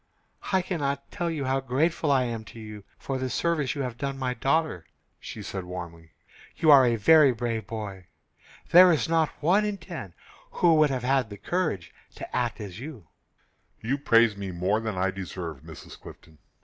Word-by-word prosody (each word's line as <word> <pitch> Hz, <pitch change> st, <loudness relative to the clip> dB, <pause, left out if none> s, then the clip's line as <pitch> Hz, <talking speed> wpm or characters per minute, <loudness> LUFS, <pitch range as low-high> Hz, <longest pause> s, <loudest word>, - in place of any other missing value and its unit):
"I 190 Hz, -2 st, +2 dB
cannot 140 Hz, -6 st, -3 dB
tell 170 Hz, -1 st, -2 dB
how 135 Hz, +1 st, +1 dB
grateful 145 Hz, +4 st, 0 dB
I 135 Hz, -2 st, +3 dB
am 115 Hz, -2 st, -4 dB
to 115 Hz, -, -12 dB
you 105 Hz, -2 st, -9 dB
for 135 Hz, -1 st, -4 dB
the 130 Hz, 0 st, -2 dB
service 155 Hz, -2 st, 0 dB
you 140 Hz, -, -2 dB
have 125 Hz, -2 st, -6 dB
done 140 Hz, -1 st, -3 dB
my 130 Hz, -1 st, -2 dB
daughter," 135 Hz, -, 0 dB, 0.3 s
she -, -, -8 dB
said, 95 Hz, -2 st, -5 dB
warmly. 85 Hz, -3 st, -9 dB, 0.4 s
"You 155 Hz, -, +4 dB
are 140 Hz, -2 st, +9 dB
a 120 Hz, -, +2 dB
very 140 Hz, +6 st, +6 dB
brave 115 Hz, -3 st, -3 dB
boy. 100 Hz, -4 st, -7 dB, 0.6 s
There 180 Hz, +1 st, +9 dB
is 155 Hz, -, +1 dB
not 160 Hz, -1 st, +2 dB
one 190 Hz, +7 st, +4 dB
in 210 Hz, -1 st, -2 dB
ten 165 Hz, -, -9 dB, 0.4 s
who 170 Hz, -2 st, +4 dB
would 155 Hz, -1 st, +4 dB
have 130 Hz, -3 st, -3 dB
had 130 Hz, -2 st, +1 dB
the 100 Hz, -, -9 dB
courage 100 Hz, -, -2 dB, 0.2 s
to -, -, -8 dB
act 120 Hz, -2 st, -1 dB
as 100 Hz, -2 st, -8 dB
you 125 Hz, -, -9 dB, 0.7 s
did." 115 Hz, -, -6 dB
"You 140 Hz, -, +2 dB
praise 115 Hz, -5 st, +4 dB
me 100 Hz, -1 st, -6 dB
more 95 Hz, +4 st, 0 dB
than 110 Hz, -4 st, -4 dB
I 95 Hz, +1 st, +1 dB
deserve, 90 Hz, -6 st, -7 dB
Mrs. -, -, -12 dB
Clifton. 80 Hz, -1 st, -14 dB
125 Hz, 190 wpm, -26 LUFS, 100-150 Hz, 0.7 s, are